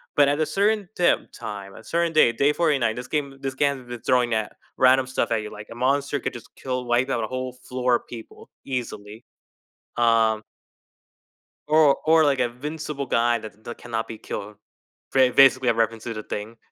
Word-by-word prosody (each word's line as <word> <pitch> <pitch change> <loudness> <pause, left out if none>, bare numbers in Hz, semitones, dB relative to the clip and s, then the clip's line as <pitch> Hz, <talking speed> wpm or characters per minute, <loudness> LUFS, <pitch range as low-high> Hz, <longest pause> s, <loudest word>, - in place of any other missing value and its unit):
But 145 -1 +5
at 145 +2 0
a 155 - +2
certain 205 +1 +1
tim 175 - +2
time, 100 -4 -7
a - - -12
certain 170 -1 0
day, 135 -6 +5
day 140 +5 +2
49, 140 -10 +1
this 125 +1 -7
game 140 -3 -2
this 135 -1 -3
game 140 0 0
has 125 - -15
been 120 -1 -7
throwing 125 -2 +2
at 110 -1 -1 0.2
random 130 0 +4
stuff 130 - -1
at 115 -1 +1
you, 105 - -8
like, 105 0 -10
a - - -8
monster 140 +3 0
could - - -2
just 120 - -12
kill 125 -1 -4
wipe 120 +2 +1
out 120 - 0
a - - -2
whole 130 +1 -4
floor 125 -1 -1
a - - +1
people 115 -2 -12 0.2
easily, 115 -4 -6 0.7
um 115 -2 +3 1.3
or 150 -2 +5
or, 160 0 +5
like, 140 -3 +2
invincible 140 +4 -3
guy 120 -1 +2
tha 110 - -8
that 120 - -7
cannot 115 -2 -4
be 110 - -7
killed. 105 0 -7 0.5
Ba 130 -1 +4
basically 130 -1 +5
a - - +4
reference 115 0 -1
to 115 - -4
The 110 -1 -6
Thing. 105 +3 -6
125 Hz, 195 wpm, -24 LUFS, 115-140 Hz, 1.3 s, But